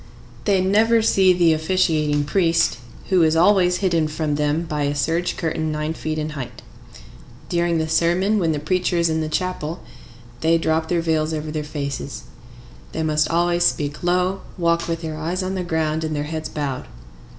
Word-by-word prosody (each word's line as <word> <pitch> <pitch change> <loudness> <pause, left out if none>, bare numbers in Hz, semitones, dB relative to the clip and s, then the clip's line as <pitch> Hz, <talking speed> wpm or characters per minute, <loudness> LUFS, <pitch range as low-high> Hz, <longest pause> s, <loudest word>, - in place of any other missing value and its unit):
They 195 -3 +3
never 220 +4 +3
see 190 -3 +4
the 175 -2 +4
officiating 155 -3 +1
priest, 165 -3 +1 0.3
who 185 -2 +4
is 160 -1 +3
always 180 +1 +4
hidden 165 -4 +2
from 155 0 -2
them 150 +2 0
by 150 -3 -2
a 145 +1 -1
serge 165 +4 -1
curtain 160 -1 -2
nine 150 +1 -2
feet 155 -1 -4
in 155 0 -2
height. 135 -5 -7 0.9
During 170 -1 +1
the 160 0 -1
sermon, 175 +6 +2
when 165 -4 +1
the 155 - -1
preacher 180 +3 0
is 170 -1 +2
in 160 0 0
the 155 - -2
chapel, 170 0 -2 0.6
they 165 +3 +3
drop 160 0 0
their 175 -1 +1
veils 160 -1 0
over 155 0 -4
their 155 -1 -3
faces. 140 -2 -5 0.7
They 160 - -2
must 155 -1 +1
always 175 +1 +2
speak 145 -3 0
low, 180 +2 +1 0.2
walk 170 -1 +1
with 165 -1 -2
their 155 -1 -4
eyes 175 +4 -2
on 185 +1 -2
the 185 -1 -2
ground 160 -2 -1
and 155 -1 -2
their 145 - -1
heads 155 0 -5
bowed. 145 -4 -4
160 Hz, 185 wpm, -21 LUFS, 155-175 Hz, 0.9 s, see